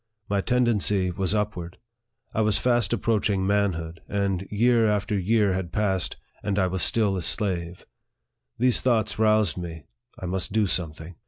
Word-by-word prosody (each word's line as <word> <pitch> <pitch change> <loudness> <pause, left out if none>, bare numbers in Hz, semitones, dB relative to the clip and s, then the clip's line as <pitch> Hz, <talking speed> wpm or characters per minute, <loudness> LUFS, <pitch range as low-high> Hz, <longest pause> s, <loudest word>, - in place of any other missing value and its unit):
My 100 -1 0
tendency 105 -6 +1
was 95 +3 -1
upward. 90 -5 -3 0.6
I 110 - +1
was 110 -1 +3
fast 120 -5 +2
approaching 105 -4 +1
manhood, 90 -5 -1
and 100 -2 -1
year 115 +2 +3
after 105 0 0
year 100 +1 +2
had 95 -2 -3
passed, 95 -4 0 0.3
and 100 -1 -2
I 95 - +3
was 90 0 -2
still 105 -1 +2
a - - -2
slave. 90 -3 -2 0.7
These 125 0 +3
thoughts 115 -5 +1
roused 110 -5 +3
me 80 -3 -7 0.3
I - - -7
must 95 +2 -2
do 110 0 +2
something. 85 -2 -3
100 Hz, 155 wpm, -25 LUFS, 90-110 Hz, 0.7 s, was